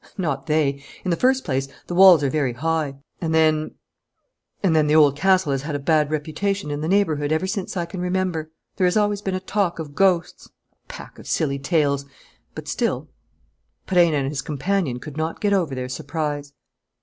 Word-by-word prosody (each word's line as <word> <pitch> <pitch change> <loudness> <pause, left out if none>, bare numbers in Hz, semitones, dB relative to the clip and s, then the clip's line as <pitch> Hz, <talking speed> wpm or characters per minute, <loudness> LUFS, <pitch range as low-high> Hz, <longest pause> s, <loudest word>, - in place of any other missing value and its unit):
"Not 160 -6 -2
they. 145 -3 +1 0.2
In 185 - 0
the - - +3
first 260 +6 +2
place, 135 -3 -1 0.2
the - - -6
walls 180 -4 +7
are 140 - +2
very 140 -5 0
high. 155 +1 -1 0.3
And 160 -2 0
then 155 -1 +2 0.9
and 175 -5 +3
then 155 -1 +3
the 150 - +3
Old 145 -3 +6
Castle 185 -1 +2
has 135 -1 0
had 150 +1 -4
a - - -1
bad 150 0 +2
reputation 155 +3 -2
in 145 0 -3
the 155 - -2
neighbourhood 160 -6 +1
ever 160 +4 +1
since 195 -1 -3
I 175 - -1
can 180 +1 -7
remember. 180 -3 -1 0.3
There 185 - +3
has 180 - +1
always 205 -1 +1
been 190 -2 -2
a - - -1
talk 185 -2 -1
of 155 -3 -7
ghosts: 180 0 +1
a - - -41
pack - - -10
of - - -12
silly 140 -4 0
tales. 140 -2 +1 0.5
But - - -8
still - - -1 0.4
" - - -48
Perenna 175 -4 +3
and 135 -1 -1
his 140 -1 -3
companion 155 -2 -1
could 150 +2 -9
not 160 +1 -2
get 205 -1 +1
over 170 -8 0
their 125 0 -4
surprise. 145 +2 -4
160 Hz, 200 wpm, -22 LUFS, 145-185 Hz, 0.9 s, walls